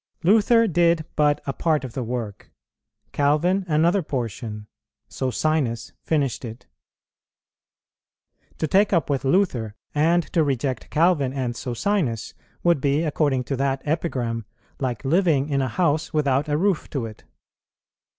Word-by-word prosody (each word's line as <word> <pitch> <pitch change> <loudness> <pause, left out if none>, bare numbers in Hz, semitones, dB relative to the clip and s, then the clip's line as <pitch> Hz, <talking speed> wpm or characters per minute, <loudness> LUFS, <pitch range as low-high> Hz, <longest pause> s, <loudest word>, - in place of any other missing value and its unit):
Luther 225 +5 +5
did 170 -4 +2
but 150 -1 +2
a 135 - -2
part 155 -1 0
of 125 -3 -7
the 130 - -3
work, 115 -4 -5 0.6
Calvin 155 +7 +2
another 170 +5 +3
portion, 115 - -4 0.4
Socinus 130 -3 -1
finished 140 -6 -1
it. 115 +1 -8 1.9
To - - -1
take 200 +6 +3
up 165 -4 +1
with 135 - -1
Luther, 135 - +1 0.2
and 165 +4 +3
to 165 - +4
reject 135 -3 -2
Calvin 155 -5 +2
and 130 -3 -2
Socinus, 125 - -2 0.3
would 170 -5 +3
be, 140 +3 +1
according 145 -4 +1
to 135 - -3
that 135 0 -1
epigram, 125 -8 -2 0.3
like 130 -2 -3
living 155 -2 +2
in 140 -2 +1
a 130 - 0
house 155 +3 0
without 145 -1 +1
a 145 - +1
roof 190 0 0
to 135 -5 -3
it. 110 -1 -10
145 Hz, 135 wpm, -23 LUFS, 130-165 Hz, 1.9 s, Luther